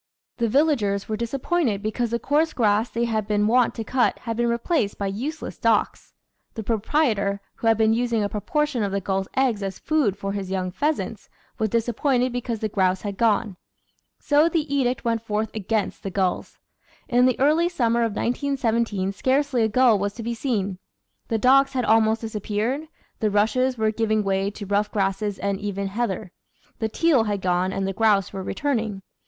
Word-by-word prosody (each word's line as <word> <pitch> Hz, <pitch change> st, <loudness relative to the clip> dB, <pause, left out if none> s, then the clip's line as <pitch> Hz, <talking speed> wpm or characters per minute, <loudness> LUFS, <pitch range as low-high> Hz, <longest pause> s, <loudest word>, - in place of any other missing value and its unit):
The 235 Hz, -2 st, 0 dB
villagers 230 Hz, -8 st, +1 dB
were 215 Hz, -, -2 dB
disappointed 235 Hz, -, -1 dB
because 230 Hz, +2 st, -1 dB
the 235 Hz, -, 0 dB
coarse 305 Hz, +6 st, +1 dB
grass 215 Hz, 0 st, +2 dB
they 235 Hz, +1 st, -1 dB
had 220 Hz, -3 st, -1 dB
been 210 Hz, -1 st, +1 dB
wont 240 Hz, +2 st, +3 dB
to 225 Hz, -, -4 dB
cut 250 Hz, +3 st, +1 dB
had 230 Hz, -2 st, -4 dB
been 235 Hz, +1 st, +1 dB
replaced 235 Hz, -, 0 dB
by 200 Hz, -, -2 dB
use 255 Hz, +12 st, -4 dB
less -, -, -7 dB
docks. -, -, 0 dB, 0.4 s
The 220 Hz, -, -4 dB
proprietor, 215 Hz, -2 st, 0 dB, 0.2 s
who 230 Hz, -, -2 dB
had 225 Hz, -1 st, +4 dB
been 220 Hz, 0 st, +3 dB
using 235 Hz, -2 st, 0 dB
a -, -, +1 dB
proportion 265 Hz, +6 st, -1 dB
of 200 Hz, -2 st, -1 dB
the 200 Hz, -, 0 dB
gulls' 190 Hz, 0 st, -2 dB
eggs 250 Hz, -6 st, +2 dB
as 195 Hz, -1 st, -4 dB
food 280 Hz, -11 st, 0 dB
for 195 Hz, 0 st, -3 dB
his 195 Hz, -2 st, -4 dB
young 185 Hz, -1 st, -2 dB
pheasants, 300 Hz, +9 st, -2 dB, 0.3 s
was 220 Hz, -, +1 dB
disappointed 245 Hz, +3 st, +1 dB
because 245 Hz, -2 st, -3 dB
the 220 Hz, -, 0 dB
grouse 190 Hz, -2 st, 0 dB
had 200 Hz, -2 st, -4 dB
gone. 215 Hz, -2 st, +1 dB, 0.6 s
So 300 Hz, +3 st, +3 dB
the 325 Hz, -2 st, 0 dB
edict 255 Hz, -3 st, 0 dB
went 230 Hz, -1 st, +1 dB
forth 215 Hz, 0 st, -2 dB
against 215 Hz, 0 st, -2 dB
the 195 Hz, -, -4 dB
gulls. 190 Hz, -1 st, -2 dB, 0.5 s
In 250 Hz, 0 st, +4 dB
the 255 Hz, -, 0 dB
early 310 Hz, +5 st, +3 dB
summer 235 Hz, -8 st, +1 dB
of 230 Hz, -2 st, 0 dB
1917 230 Hz, -7 st, 0 dB
scarcely 265 Hz, +3 st, +1 dB
a 220 Hz, -, +3 dB
gull 235 Hz, -2 st, +4 dB
was 200 Hz, +1 st, -2 dB
to 230 Hz, -, -6 dB
be 235 Hz, +1 st, -2 dB
seen; 205 Hz, -7 st, -2 dB, 0.5 s
the 225 Hz, -, 0 dB
docks 270 Hz, +4 st, +4 dB
had 250 Hz, -3 st, 0 dB
almost 220 Hz, 0 st, +3 dB
disappeared; 220 Hz, +6 st, -2 dB, 0.3 s
the 215 Hz, -, +1 dB
rushes 225 Hz, +5 st, +1 dB
were 220 Hz, -1 st, +1 dB
giving 215 Hz, -1 st, 0 dB
way 195 Hz, 0 st, 0 dB
to 205 Hz, 0 st, -8 dB
rough 205 Hz, +1 st, 0 dB
grasses 195 Hz, 0 st, -1 dB
and 200 Hz, -1 st, -2 dB
even 200 Hz, -1 st, -3 dB
heather; 195 Hz, -4 st, -3 dB, 0.5 s
the 220 Hz, -, -1 dB
teal 275 Hz, -2 st, +3 dB
had 205 Hz, -1 st, -1 dB
gone 185 Hz, 0 st, 0 dB
and 195 Hz, 0 st, -2 dB
the 195 Hz, -, -2 dB
grouse 205 Hz, -3 st, +2 dB
were 195 Hz, -, -4 dB
returning. 220 Hz, -4 st, -2 dB
220 Hz, 190 wpm, -24 LUFS, 200-250 Hz, 0.6 s, had